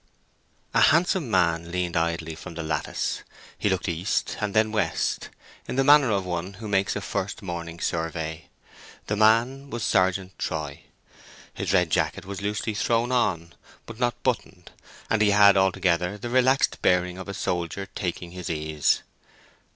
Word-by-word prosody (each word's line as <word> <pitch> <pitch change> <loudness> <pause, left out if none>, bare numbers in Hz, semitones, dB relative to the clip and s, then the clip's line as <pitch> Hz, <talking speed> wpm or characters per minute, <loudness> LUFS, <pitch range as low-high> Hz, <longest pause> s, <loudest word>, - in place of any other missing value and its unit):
A - - +4
handsome 165 - +3
man 85 -4 +1
leaned 90 -1 -2
idly 80 -1 -1
from 85 +1 -9
the 85 - -4
lattice. 75 -1 -2 0.3
He 105 - 0
looked 95 0 -1
east 85 +4 -1
and 105 -1 -2
then 110 0 +3
west, 105 -6 -1 0.4
in - - -4
the 135 - +3
manner 145 -2 +6
of 100 -3 0
one 90 +2 -3
who 105 +3 -8
makes 100 -1 +1
a - - -3
first 100 +3 -4
morning 85 -2 -6
survey. 80 -1 -3 0.6
The 105 - -1
man 115 +6 +3
was 120 -4 -4
Sergeant 95 0 +1
Troy. 75 -4 -4 0.7
His - - -3
red 90 -4 +3
jacket - - 0
was 100 0 -6
loosely 105 +2 -2
thrown 115 +3 +1
on, 85 -9 0 0.3
but 115 0 -10
not 120 -1 -1
buttoned, 95 -8 -2 0.4
and 115 - +1
he 105 - +5
had 100 0 +7
altogether 95 -1 +1
the 120 +3 -6
relaxed 130 +2 +3
bearing 90 0 +2
of 95 - -7
a - - -4
soldier 90 +3 -2
taking 85 -1 -4
his 90 0 -6
ease. 75 -2 0
95 Hz, 160 wpm, -25 LUFS, 85-110 Hz, 0.7 s, had